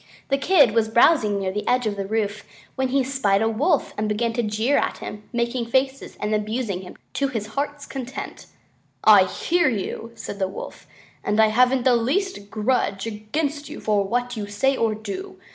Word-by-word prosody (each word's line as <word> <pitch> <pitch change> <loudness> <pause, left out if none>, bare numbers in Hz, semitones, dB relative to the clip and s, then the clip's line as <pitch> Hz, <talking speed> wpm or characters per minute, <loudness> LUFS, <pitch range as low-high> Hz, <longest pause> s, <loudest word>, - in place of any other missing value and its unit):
The 275 - +3
Kid 290 - +5
was 220 0 +2
browsing 225 -3 +4
near 190 -1 -1
the 210 +2 -4
edge 250 -1 +2
of 210 -1 -1
the 195 -1 -4
roof, 210 -1 -1 0.3
when 265 -1 0
he 270 +1 +2
spied 245 -6 +1
a - - +2
Wolf 260 +11 +1
and 215 0 0
began 230 +2 0
to 240 - 0
jeer 220 +5 +1
at - - -1
him, 210 0 -8
making 235 0 -1
faces 265 +2 -1
and 210 +1 -1
abusing 210 -2 -1
him 180 - -11 0.2
to 280 - +1
his 225 -6 -3
heart's 290 +1 -3
content. 265 -1 -7 0.6
"I 205 -3 +8
hear 345 - +1
you," 225 +1 -4
said 205 -2 -7
the 190 - +1
Wolf, 190 - -9 0.4
"and 210 +1 0
I 220 0 +6
haven't 250 +3 +3
the 250 -1 +5
least 255 - -1
grudge 215 -3 0
against 285 +8 -3
you - - -7
for 210 -2 +1
what 245 +4 -1
you 210 -2 -4
say 270 +7 +1
or 225 -3 +1
do. 225 - -7
230 Hz, 195 wpm, -23 LUFS, 210-265 Hz, 0.6 s, I